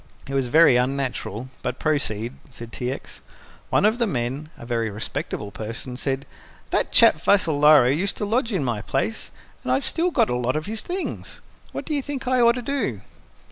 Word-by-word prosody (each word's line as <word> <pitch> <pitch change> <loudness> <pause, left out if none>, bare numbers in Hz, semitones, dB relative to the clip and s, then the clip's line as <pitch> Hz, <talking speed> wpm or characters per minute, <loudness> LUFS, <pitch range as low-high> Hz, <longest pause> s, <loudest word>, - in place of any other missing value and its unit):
"It 135 - -6
was 135 -2 +1
very 150 -1 +6
unnatural, 130 -2 -2
but 125 0 -3
proceed," 120 -6 -1 0.2
said 120 -2 -10
T. 125 +3 -3
X. 135 - -9 0.5
"One - - +3
of 220 +3 +3
the 235 - +2
men 135 0 -3
a - - -10
very 115 -2 -1
respectable 105 -1 -4
person 115 +4 -6
said, 135 +1 -2 0.5
'That - - +1
chap - - +6
Vassalaro 150 -8 +5
used 190 +5 -1
to 210 - -2
lodge 230 +3 0
in 185 -8 0
my 120 -5 -1
place, - - -2 0.3
and 125 - -2
I've 130 +2 +1
still 340 +2 +1
got - - +2
a - - +1
lot 125 +2 0
of 155 - -2
his 220 +2 -4
things. 365 +2 -5 0.3
What - - -5
do 310 - -3
you 285 - +1
think 270 -2 -5
I 255 -1 +3
ought 235 0 +5
to 250 - -4
do?'" 230 - -2
135 Hz, 195 wpm, -23 LUFS, -, 0.5 s, very